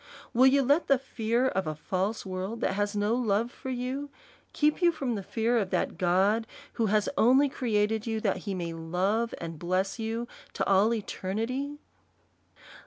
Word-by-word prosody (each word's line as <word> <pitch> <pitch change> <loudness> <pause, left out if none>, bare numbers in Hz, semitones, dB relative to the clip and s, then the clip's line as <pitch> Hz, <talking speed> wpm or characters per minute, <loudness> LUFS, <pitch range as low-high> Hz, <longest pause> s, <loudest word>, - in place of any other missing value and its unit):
Will 255 +3 +6
you 275 +1 +4
let 285 +6 +2
the 275 - +5
fear 240 -1 0
of 190 -8 -1
a 155 - -2
false 190 +8 -2
world, 190 +4 -4
that - - +1
has 205 +1 -1
no 205 +2 +1
love 235 -1 +1
for 260 - -8
you, 260 +3 -3 0.4
keep 300 +3 +1
you 345 -1 +5
from 270 -6 -2
the 205 - -3
fear 230 +4 0
of 195 -4 -2
that - - -1
God, 195 +5 +2 0.3
who 225 - 0
has 210 0 +2
only 260 +5 +5
created 220 -3 0
you, 220 -1 -1
that 200 -3 +1
he 195 +1 -4
may 170 -2 -3
love 185 +8 -1
and 165 -2 -6
bless 185 +5 -1
you 225 +2 -3 0.3
to - - -1
all 200 +3 +4
eternity 230 +6 -3
220 Hz, 175 wpm, -28 LUFS, 195-245 Hz, 0.4 s, Will